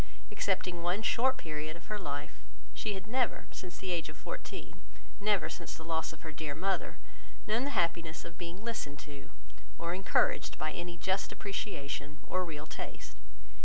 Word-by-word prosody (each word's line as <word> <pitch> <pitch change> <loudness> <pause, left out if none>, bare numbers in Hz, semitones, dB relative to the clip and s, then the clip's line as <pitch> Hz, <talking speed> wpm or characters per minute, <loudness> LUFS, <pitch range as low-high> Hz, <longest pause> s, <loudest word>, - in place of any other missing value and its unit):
Excepting 180 -3 +2
one 180 +5 +2
short 260 +4 +5
period 155 0 -2
of 170 - -14
her 210 -1 -1
life, 145 -7 -3 0.3
she 210 - 0
had 190 - -4
never, 250 +3 +2
since 180 -1 -6
the 190 - -2
age 170 -3 +1
of 155 - -8
fourteen, - - -5 0.4
never 205 -1 +4
since 170 - -4
the 160 - -8
loss 160 -1 +1
of 160 - -11
her 160 - -3
dear 145 -1 -2
mother, 190 +4 +1 0.5
known 225 +5 +3
the - - +2
happiness 165 -1 +2
of 170 - -7
being 175 +4 -5
listened 150 -11 -1
to, 145 -1 -8 0.5
or 170 0 0
encouraged 190 +1 +4
by 155 0 +1
any 175 +1 -3
just 190 +3 +2
appreciation 145 -8 -2
or 185 0 +2
real 155 -3 -4
taste. - - -5
170 Hz, 170 wpm, -35 LUFS, 155-195 Hz, 0.5 s, short